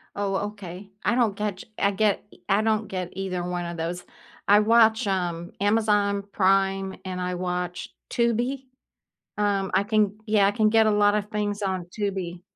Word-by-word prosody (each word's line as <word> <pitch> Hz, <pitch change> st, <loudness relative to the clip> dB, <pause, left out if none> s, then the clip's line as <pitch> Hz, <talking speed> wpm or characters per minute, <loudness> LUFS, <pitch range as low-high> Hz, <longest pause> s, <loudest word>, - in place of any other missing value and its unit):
Oh, 200 Hz, -1 st, -1 dB, 0.2 s
okay. 195 Hz, -1 st, -10 dB
I 235 Hz, -, +2 dB
don't 230 Hz, -5 st, +2 dB
get 210 Hz, -2 st, -2 dB
ch -, -, -10 dB
I 200 Hz, -, +3 dB
get 205 Hz, +1 st, +1 dB, 0.2 s
i 200 Hz, 0 st, +3 dB
I -, -, +2 dB
don't 215 Hz, -1 st, 0 dB
get 185 Hz, -2 st, -4 dB
either 185 Hz, -2 st, -3 dB
one 175 Hz, 0 st, -3 dB
of 170 Hz, 0 st, -5 dB
those. 170 Hz, +2 st, -3 dB, 0.4 s
I 205 Hz, +1 st, +7 dB
watch, 220 Hz, +1 st, +4 dB
um, 175 Hz, -3 st, -2 dB
Amazon 205 Hz, -1 st, +2 dB
Prime 195 Hz, -1 st, +2 dB
and 185 Hz, -1 st, -4 dB
I 180 Hz, 0 st, -2 dB
watch 180 Hz, 0 st, -3 dB, 0.2 s
Tubi. 240 Hz, +3 st, 0 dB, 0.7 s
Um, 200 Hz, -2 st, 0 dB
I -, -, +3 dB
can 210 Hz, -1 st, +1 dB
yeah, 210 Hz, -2 st, +4 dB
I -, -, +2 dB
can 215 Hz, +1 st, +2 dB
get 220 Hz, 0 st, +4 dB
a 215 Hz, -, +3 dB
lot 205 Hz, 0 st, +4 dB
of 210 Hz, 0 st, -2 dB
things 210 Hz, -1 st, -2 dB
on 190 Hz, -3 st, -2 dB
Tubi. 185 Hz, -3 st, -4 dB
200 Hz, 180 wpm, -25 LUFS, 185-215 Hz, 0.7 s, I